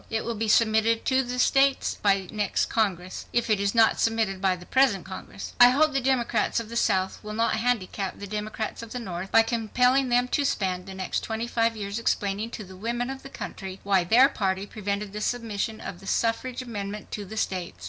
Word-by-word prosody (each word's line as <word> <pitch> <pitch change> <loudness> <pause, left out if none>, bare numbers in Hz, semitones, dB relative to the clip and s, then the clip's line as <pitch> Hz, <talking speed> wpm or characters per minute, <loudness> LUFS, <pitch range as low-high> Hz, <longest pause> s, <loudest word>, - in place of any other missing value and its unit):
It 220 0 -2
will 235 - -2
be 225 0 -2
submitted 220 +1 +3
to 260 0 +3
the 250 -1 -4
states 275 +2 +3
by 195 -1 +3
the 185 - -12
next 210 -2 0
Congress, 185 -5 -1
if 235 -2 +1
it 210 - +3
is 200 +2 0
not 225 -1 +4
submitted 220 -4 0
by 190 -2 +2
the 180 0 -12
present 255 -8 +2
Congress. 190 +1 -8
"I 245 - +10
hope 295 +4 +3
the 270 - +1
Democrats 250 -2 +1
of 225 -1 -7
the 235 - -7
South 190 -4 +1
will 210 0 -6
not 230 0 +1
handicap 215 -5 -1
the 200 - -7
Democrats 215 +2 -4
of 230 -1 -9
the 250 - -3
North 190 -4 -6
by 225 - +6
compelling 250 +3 +2
them 245 +1 +3
to 290 - +1
spend 185 -8 -1
the 190 - -8
next 190 -1 -2
twenty 225 +1 -3
five 230 -1 0
years 200 +1 -4
explaining 205 -1 -1
to 225 - -7
the 190 -1 -12
women 240 +5 -2
of 270 0 -7
the 275 - -10
country 190 -7 -7
why 195 -2 +3
their 235 +9 +6
party 195 -7 -1
prevented 205 -1 -4
the 210 - -5
submission 220 -2 -2
of 175 - -7
the 195 - -13
suffrage 235 +4 -1
amendment 210 -3 -6
to 210 - -4
the 215 +3 -9
states. 185 -5 -2
220 Hz, 220 wpm, -26 LUFS, 195-240 Hz, -, I